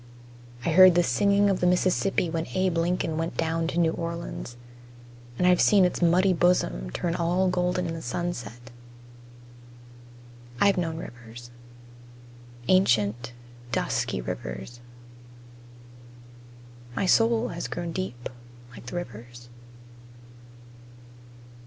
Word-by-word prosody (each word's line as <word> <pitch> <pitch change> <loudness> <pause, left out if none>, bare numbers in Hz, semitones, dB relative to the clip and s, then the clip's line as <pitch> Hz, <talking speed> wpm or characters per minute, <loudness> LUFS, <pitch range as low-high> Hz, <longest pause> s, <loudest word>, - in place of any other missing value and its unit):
I 170 - +1
heard 185 +1 +8
the 175 - +4
singing 200 +2 +2
of 195 -2 +1
the 180 - +2
Mississippi 180 +1 +1
when 165 0 -3
Abe 185 -2 +1
Lincoln 170 -2 -1
went 165 +1 -3
down 165 0 -1
to 170 - -4
New 165 -2 +3
Orleans, 170 -7 -6 0.8
and 180 - +1
I've 180 -1 +4
seen 200 -3 +5
its 180 - -2
muddy 180 +3 +4
bosom 60 - +1
turn 165 - -2
all 175 +2 +1
golden 180 0 0
in 165 - -3
the 165 - -6
sunset. 120 - -5 1.9
I've 200 -1 +4
known 165 -3 -2
rivers: 120 -4 -10 1.2
Ancient, 120 - +2 0.4
dusky 65 - -1
rivers. - - -6 2.2
My 190 - 0
soul 230 +4 +3
has - - -5
grown 170 -1 -5
deep 160 -10 -5 0.4
like 125 - -13
the - - -6
rivers. 120 -5 -8
170 Hz, 115 wpm, -26 LUFS, 120-180 Hz, 2.2 s, heard